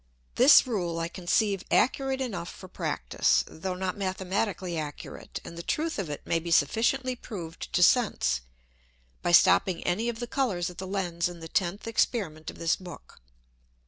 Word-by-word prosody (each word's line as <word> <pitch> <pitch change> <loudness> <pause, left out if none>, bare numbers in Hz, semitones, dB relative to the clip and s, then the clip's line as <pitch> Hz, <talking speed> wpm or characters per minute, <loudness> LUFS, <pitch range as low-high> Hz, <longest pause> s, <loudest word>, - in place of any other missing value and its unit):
This 270 +4 +7
Rule 180 -9 -2
I 165 0 -1
conceive 195 +3 0
accurate 265 +1 +2
enough 200 -9 -4
for 185 - -11
practice, - - 0
though 180 +3 -5
not 185 0 -2
mathematically 190 -1 -2
accurate; 150 -2 -6
and 170 - -8
the 170 - -6
truth 315 - -2
of 185 -6 -3
it 145 - -6
may 165 - +1
be 170 +1 -6
sufficiently 250 +8 +2
proved 175 -9 -8
to 180 +1 +3
Sense, 200 - +3 0.8
by 175 - 0
stopping 175 +1 +5
any 215 +7 0
of 230 -1 -5
the 240 - -3
Colours 225 - -1
at 175 - -12
the 190 - -5
Lens 180 -3 -1
in 175 -1 -10
the 165 - -8
tenth 180 +4 -1
Experiment 200 -8 -1
of - - -9
this 165 0 +1
Book. 180 - -12
185 Hz, 170 wpm, -28 LUFS, 170-225 Hz, 0.8 s, This